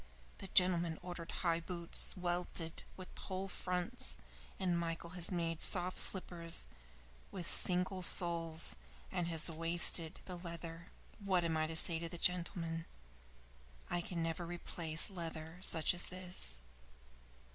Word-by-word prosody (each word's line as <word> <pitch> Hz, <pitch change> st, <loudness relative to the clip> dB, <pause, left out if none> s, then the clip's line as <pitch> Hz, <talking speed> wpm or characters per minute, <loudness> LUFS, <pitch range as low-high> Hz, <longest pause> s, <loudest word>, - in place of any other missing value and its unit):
The 195 Hz, -, -8 dB
gentleman 175 Hz, -3 st, +2 dB
ordered 175 Hz, -2 st, -7 dB
high 170 Hz, -2 st, 0 dB
boots, 170 Hz, +2 st, -1 dB
welted, 175 Hz, -2 st, -3 dB, 0.2 s
with 185 Hz, -1 st, -11 dB
whole 190 Hz, +1 st, -5 dB
fronts, 180 Hz, -1 st, 0 dB, 0.4 s
and 180 Hz, -2 st, 0 dB
Michael 170 Hz, 0 st, -4 dB
has 180 Hz, -2 st, +4 dB
made 165 Hz, -2 st, -2 dB
soft 180 Hz, 0 st, +3 dB
slippers 170 Hz, -3 st, +5 dB, 0.6 s
with 180 Hz, -3 st, -7 dB
single 185 Hz, +1 st, +2 dB
soles, 170 Hz, -2 st, +2 dB, 0.4 s
and 175 Hz, -, -2 dB
has 165 Hz, -2 st, +4 dB
wasted 165 Hz, 0 st, +2 dB
the 180 Hz, -2 st, -7 dB
leather. 170 Hz, -1 st, -8 dB, 0.3 s
What 190 Hz, -4 st, 0 dB
am 165 Hz, -1 st, -1 dB
I 155 Hz, 0 st, 0 dB
to 165 Hz, -, -5 dB
say 165 Hz, 0 st, +2 dB
to 170 Hz, 0 st, -5 dB
the 175 Hz, -, -7 dB
gentleman? 170 Hz, -2 st, -1 dB, 1.0 s
I 175 Hz, -, 0 dB
can 170 Hz, -1 st, -4 dB
never 165 Hz, +1 st, -3 dB
replace 170 Hz, 0 st, 0 dB
leather 165 Hz, -1 st, -7 dB
such 165 Hz, -3 st, +2 dB
as 180 Hz, -, +5 dB
this." 180 Hz, -, -1 dB
170 Hz, 135 wpm, -36 LUFS, 165-180 Hz, 1.0 s, slippers